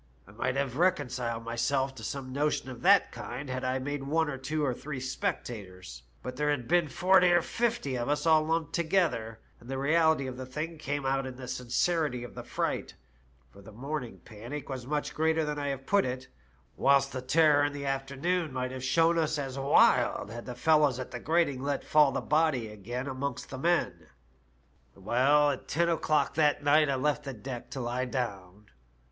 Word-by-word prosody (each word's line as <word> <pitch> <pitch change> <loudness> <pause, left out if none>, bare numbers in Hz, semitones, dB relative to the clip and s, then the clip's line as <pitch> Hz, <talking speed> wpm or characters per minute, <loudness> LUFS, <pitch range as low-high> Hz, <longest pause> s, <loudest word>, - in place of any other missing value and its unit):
I - - -14
might 125 +4 -2
have 135 -2 -2
reconciled 125 -9 0
myself 130 +4 0
to 115 -4 -11
some 130 0 -5
notion 145 -2 -1
of 120 - -10
that 195 +2 +5
kind 130 +1 -6
had 130 0 -3
I 130 +1 0
made 145 +2 -3
one 155 +2 0
of 135 -1 -7
two 150 +2 -1
or 130 - 0
three 135 +2 -6
spectators; 105 - -5 0.2
but 125 +1 -6
here 150 0 +1
had 130 -5 -1
been 175 -1 +3
forty 180 +5 +4
or 175 -1 +4
fifty 230 - -1
of 120 - -2
us 145 +2 0
all 160 -1 +5
lumped 160 -1 -1
together, 160 - 0 0.2
and 120 - -15
the 135 - -3
reality 160 +1 +3
of 130 -1 -6
the 130 - -6
thing 155 +5 -5
came 145 -1 -3
out 135 0 0
in 130 - -7
the 130 0 -9
sincerity 125 +2 0
of 120 - -9
the - - -7
fright, - - -3 0.6
for 100 - -15
the 100 - -13
morning 130 +2 -5
panic 120 +7 -8
was 130 -2 -5
much 150 +1 -2
greater 160 0 +1
than 150 0 -3
I 145 - -2
have 135 -1 -4
put 200 +5 +3
it, 130 0 -4 0.5
whilst 140 0 +3
the 130 - -3
terror 145 +2 +4
in 145 - +1
the 140 -1 -5
afternoon 140 +5 -1
might 130 -1 -3
have 130 -1 -6
shown 165 +5 +3
as 155 -1 0 0.2
wild, 135 -5 +3
had 120 +2 -8
the 125 - -5
fellows 145 0 +3
at 130 - -6
the 120 - -5
grating 155 -3 +1
let 140 0 -2
fall 150 -2 +4
the - - -2
body 150 -7 +1
again 115 +5 -5
amongst 135 -1 -4
the 130 - -6
men. 170 +4 0 0.4
" - - -37
Well, 135 +8 +3
at 135 - -6
ten 170 +2 +1
o'clock 155 -2 +1
that 150 -2 +2
night 150 +1 +4
I 135 - +1
left 145 +2 0
the 135 - -5
deck 120 +2 -7
to 135 - -6
lie 125 +2 -2
down. 105 -6 -5
135 Hz, 200 wpm, -29 LUFS, 125-155 Hz, 0.6 s, that